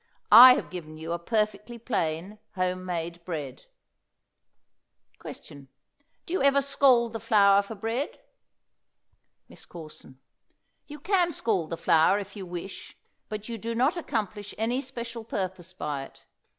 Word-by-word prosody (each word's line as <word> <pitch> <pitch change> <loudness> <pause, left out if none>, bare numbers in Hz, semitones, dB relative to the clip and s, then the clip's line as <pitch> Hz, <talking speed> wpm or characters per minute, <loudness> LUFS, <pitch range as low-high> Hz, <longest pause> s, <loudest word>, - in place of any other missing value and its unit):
I 250 +4 +11
have - - -5
given 155 -4 -8
you 160 +1 -6
a 170 - -3
perfectly 215 +4 -2
plain 195 -3 -3 0.2
home 185 0 -1
made 170 -1 -4
bread. 150 -7 -6 1.5
Question. 140 -1 -11 0.6
Do 335 - -6
you 375 - 0
ever 280 0 +4
scald 260 -4 +3
the 225 - -4
flour 200 -4 +4
for 205 +2 -9
bread? 225 +7 -3 1.3
MISS - - -14
CORSON. 155 -5 -12 0.7
You 295 0 -10
can 360 +1 +1
scald 200 - -1
the 165 - -4
flour 165 +3 +4
if 200 0 -7
you 195 -3 -7
wish, 175 +2 -8 0.3
but 215 0 -6
you 230 -1 -5
do 230 +2 -4
not 265 +8 +2
accomplish 215 - -4
any 240 +4 0
special 235 -3 -7
purpose 185 -4 -5
by 145 -6 -4
it. - - -19
205 Hz, 140 wpm, -27 LUFS, 175-235 Hz, 1.5 s, I